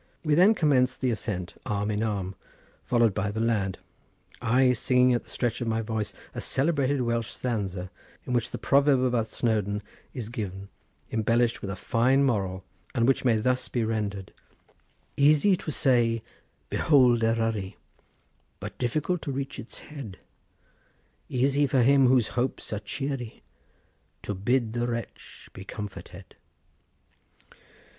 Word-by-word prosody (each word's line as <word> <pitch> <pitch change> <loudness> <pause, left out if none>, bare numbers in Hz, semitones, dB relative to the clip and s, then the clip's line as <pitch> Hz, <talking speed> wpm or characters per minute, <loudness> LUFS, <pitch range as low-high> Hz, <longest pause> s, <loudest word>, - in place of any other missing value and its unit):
We 155 -2 +1
then 190 +8 +6
commenced 130 -7 +2
the 130 -2 +1
ascent, 95 -5 -4
arm 105 0 -1
in 105 0 -1
arm, 100 -4 -2 0.5
followed 120 -4 +3
by 105 +1 -1
the 105 +2 -4
lad, 105 -5 0 0.6
I 125 +2 +4
singing 125 +1 +3
at 120 - -1
the - - -15
stretch 120 -2 -2
of 120 - -2
my 115 0 0
voice 110 -1 -2 0.2
a - - -5
celebrated 140 -2 +1
Welsh 115 -2 -1
stanza, 100 -7 -3 0.3
in 125 - -3
which 120 -2 +1
the - - -5
proverb 140 -1 +3
about 120 -3 +1
Snowdon 105 -3 -1 0.3
is 115 -4 -6
given, 100 -5 -5 0.4
embellished 115 +2 +1
with 100 - -5
a 95 - -3
fine 130 +8 +2
moral, 95 -7 0 0.3
and 115 -1 +2
which 135 - +2
may 120 -4 +3
thus 125 +3 0
be 120 - -1
rendered:— 105 -3 -3 0.8
"Easy 150 +7 +5
to - - -6
say, 120 -5 +2 0.5
'Behold 125 -6 +4
Eryri,' 115 -4 0 0.8
But - - -8
difficult 155 +8 -1
to 140 - -4
reach 135 0 -4
its 115 - -10
head; 135 -11 -9 1.1
Easy 140 +3 +2
for 130 -2 +3
him 135 +1 +5
whose 125 -3 +3
hopes 125 -2 -2
are 105 - -2
cheery 125 +2 -5 0.8
To 105 - -3
bid 115 +4 0
the 120 0 -1
wretch 115 -1 -7
be 95 - -9
comforted." 105 0 -9
120 Hz, 145 wpm, -27 LUFS, 105-130 Hz, 1.1 s, then